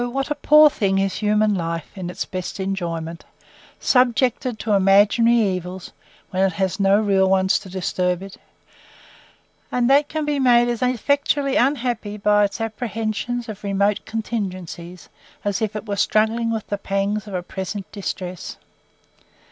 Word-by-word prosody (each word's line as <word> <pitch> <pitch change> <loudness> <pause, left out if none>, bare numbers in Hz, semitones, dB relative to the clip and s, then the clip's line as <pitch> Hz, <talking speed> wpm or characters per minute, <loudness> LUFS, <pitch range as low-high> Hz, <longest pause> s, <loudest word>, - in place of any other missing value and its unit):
what 270 +4 -3
a - - +4
poor 300 +1 +6
thing 195 -9 0
is 195 0 0
human 210 0 +2
life 165 -3 -4
in 185 -3 -5
its 180 - -4
best 185 +2 -6
enjoyments! 170 -4 -4 0.6
subjected 250 -1 +2
to 215 - -3
imaginary 205 +4 +4
evils, 185 -4 -2 0.4
when 185 - -1
it 190 -2 +2
has 190 +1 -1
no 195 +1 +4
real 195 -3 +2
ones 190 0 +3
to 195 - -12
disturb 180 0 -1
it; 195 0 -10 1.4
and 245 -1 +1
that 285 +1 +4
can 310 -1 -2
be 295 -1 0
made 240 -2 +4
as 240 -2 -2
effectually 275 +3 +1
unhappy 245 -7 0
by 210 0 +3
its 200 - -2
apprehensions 225 +1 -3
of 210 -2 -8
remote 200 +1 +1
contingencies, 185 -6 -5 0.4
as 205 +1 -1
if 215 0 -2
it 215 - -5
was 200 -1 -1
struggling 225 +2 +1
with 225 -2 -2
the 205 - -4
pangs 200 +2 -2
of 200 - -6
a 180 - -2
present 190 +2 -5
distress! 185 -3 -6
205 Hz, 155 wpm, -21 LUFS, 190-235 Hz, 1.4 s, poor